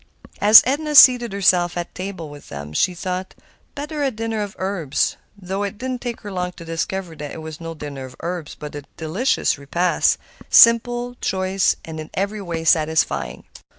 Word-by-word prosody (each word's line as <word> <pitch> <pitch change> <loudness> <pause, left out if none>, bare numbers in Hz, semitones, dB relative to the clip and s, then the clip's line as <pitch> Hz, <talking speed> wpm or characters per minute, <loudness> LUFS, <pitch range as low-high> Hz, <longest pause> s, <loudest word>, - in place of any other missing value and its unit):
As 210 +2 +9
Edna 300 +4 -1
seated 245 -4 +8
herself 180 -3 +2
at 175 - -5
table 185 -3 -6
with 145 -1 -13
them 70 +1 -8
she 180 - +1
thought, 185 +1 -5 0.4
"Better 295 +1 -5
a 280 - +2
dinner 225 -2 -3
of 205 -1 -5
herbs," 185 -7 -1 0.2
though 190 +1 -4
it 205 +1 -4
did 260 +3 -4
not 250 - -5
take 240 -2 -5
her 205 - -8
long 180 -1 -3
to 170 - -12
discover 165 +1 -4
that 150 -1 -6
it 160 - -8
was 160 0 -8
no 165 0 -6
dinner 140 -3 -7
of 130 0 -12
herbs, 170 -3 -5
but 150 -1 -9
a 145 -1 -7
delicious 165 - 0
repast, 170 +5 +1 0.3
simple, 240 +1 +5
choice, 190 0 +1
and 160 -1 -7
in 155 - -8
every 200 +2 -2
way 170 -3 -4
satisfying. 160 -1 +1
185 Hz, 185 wpm, -21 LUFS, 160-220 Hz, 0.4 s, As